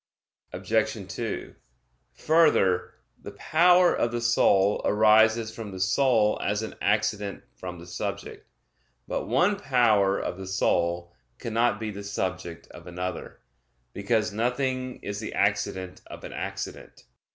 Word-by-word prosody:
Obj. -, -, -1 dB
2: -, -, -5 dB, 0.6 s
Further, 155 Hz, -, +2 dB, 0.3 s
the -, -, -9 dB
power 180 Hz, +2 st, +4 dB
of 120 Hz, -, 0 dB
the 120 Hz, -, -2 dB
soul 105 Hz, -4 st, +3 dB
arises 110 Hz, +1 st, +4 dB
from 110 Hz, -3 st, -7 dB
the 95 Hz, -1 st, -8 dB
soul 105 Hz, +2 st, +2 dB
as 105 Hz, +2 st, -1 dB
an 110 Hz, -, -6 dB
accident 105 Hz, -1 st, 0 dB
from 90 Hz, +7 st, -7 dB
the 85 Hz, -, -11 dB
subject. 85 Hz, -, -6 dB, 0.6 s
But -, -, -3 dB
one 180 Hz, -, +2 dB
power 110 Hz, -, +3 dB
of 90 Hz, -, -4 dB
the 95 Hz, -, -7 dB
soul 85 Hz, -2 st, 0 dB, 0.2 s
cannot 115 Hz, -2 st, 0 dB
be 110 Hz, -1 st, -4 dB
the 100 Hz, 0 st, -8 dB
subject 95 Hz, -4 st, -4 dB
of -, -, -13 dB
another; 90 Hz, +1 st, -6 dB, 0.5 s
because 105 Hz, +1 st, 0 dB
nothing 130 Hz, +3 st, -1 dB
is 100 Hz, 0 st, -4 dB
the 105 Hz, -, -6 dB
accident 100 Hz, -2 st, -1 dB
of -, -, -11 dB
an -, -, -8 dB
accident. -, -, -6 dB
105 Hz, 130 wpm, -26 LUFS, 95-120 Hz, 0.6 s, power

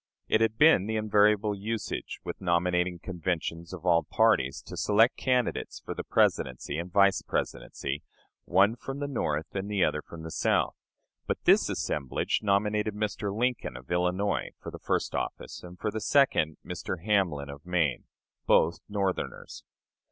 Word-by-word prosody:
It 110 Hz, -, +3 dB
had 110 Hz, -1 st, +1 dB
been 145 Hz, -, +6 dB
the 110 Hz, -, -1 dB
invariable 105 Hz, -1 st, +3 dB
usage 110 Hz, +3 st, -4 dB
with -, -, -6 dB
nominating 90 Hz, 0 st, +1 dB
conventions 85 Hz, -2 st, -3 dB
of 95 Hz, -1 st, -8 dB
all 85 Hz, -2 st, +5 dB
parties 95 Hz, -14 st, +2 dB
to -, -, -9 dB
select 110 Hz, +4 st, +3 dB
candidates 125 Hz, -2 st, -1 dB
for -, -, -6 dB
the -, -, -5 dB
Presidency 65 Hz, +4 st, +1 dB
and 90 Hz, +1 st, -6 dB
Vice 100 Hz, +1 st, +4 dB
Presidency, 70 Hz, +1 st, -3 dB, 0.4 s
one 100 Hz, +5 st, +4 dB
from 135 Hz, +3 st, -6 dB
the 145 Hz, 0 st, -3 dB
North 80 Hz, -, -2 dB
and 95 Hz, +1 st, -3 dB
the 100 Hz, -3 st, +2 dB
other -, -, +1 dB
from 80 Hz, -1 st, -11 dB
the 80 Hz, -, -7 dB
South; -, -, +1 dB, 0.5 s
but -, -, -2 dB
this -, -, +5 dB
assemblage 70 Hz, -4 st, -1 dB
nominated 105 Hz, +1 st, +1 dB
Mr. 105 Hz, -1 st, -2 dB
Lincoln, 120 Hz, -, -1 dB
of 65 Hz, +5 st, -13 dB
Illinois, 90 Hz, +3 st, 0 dB
for -, -, -8 dB
the -, -, -9 dB
first -, -, -1 dB
office, -, -, -4 dB
and 90 Hz, 0 st, -11 dB
for 105 Hz, -, -2 dB
the 110 Hz, -, -4 dB
second, 100 Hz, -, +3 dB
Mr. 85 Hz, -2 st, -5 dB
Hamlin, 85 Hz, -10 st, +1 dB
of 70 Hz, +1 st, -11 dB
Maine 85 Hz, -7 st, 0 dB, 0.4 s
both 85 Hz, +1 st, +4 dB
Northerners. 100 Hz, -2 st, -3 dB
95 Hz, 160 wpm, -28 LUFS, 85-105 Hz, 0.5 s, been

